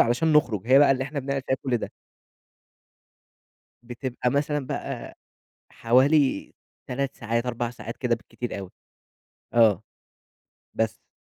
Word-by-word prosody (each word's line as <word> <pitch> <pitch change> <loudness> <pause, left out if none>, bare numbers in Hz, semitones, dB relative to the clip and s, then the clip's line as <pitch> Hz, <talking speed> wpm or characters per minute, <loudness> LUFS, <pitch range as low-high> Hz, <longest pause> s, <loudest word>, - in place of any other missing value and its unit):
علشان 125 +7 +3
نخرُج. 115 -9 +2
هي 130 +2 +7
بقى 145 - +6
اللي 130 0 +2
إحنا 140 0 -4
بنعمل 135 0 -2
فيها 130 - +1
كل 130 -3 +1
ده. - - -5 1.9
بتبقى 125 +1 -3
مثلًا 145 -1 0
بقى، - - -5 0.5
حوالي 130 +2 +3 0.3
3 135 +2 -3
ساعات 115 +1 -1
4 120 -1 -2
ساعات 115 -1 -8
كده، 125 -2 +1
بالكتير 115 -1 -6
أوي 95 -2 -7 0.8
آه. 110 -4 +5 0.9
بس. 110 -1 -2
125 Hz, 125 wpm, -25 LUFS, 115-140 Hz, 1.9 s, هي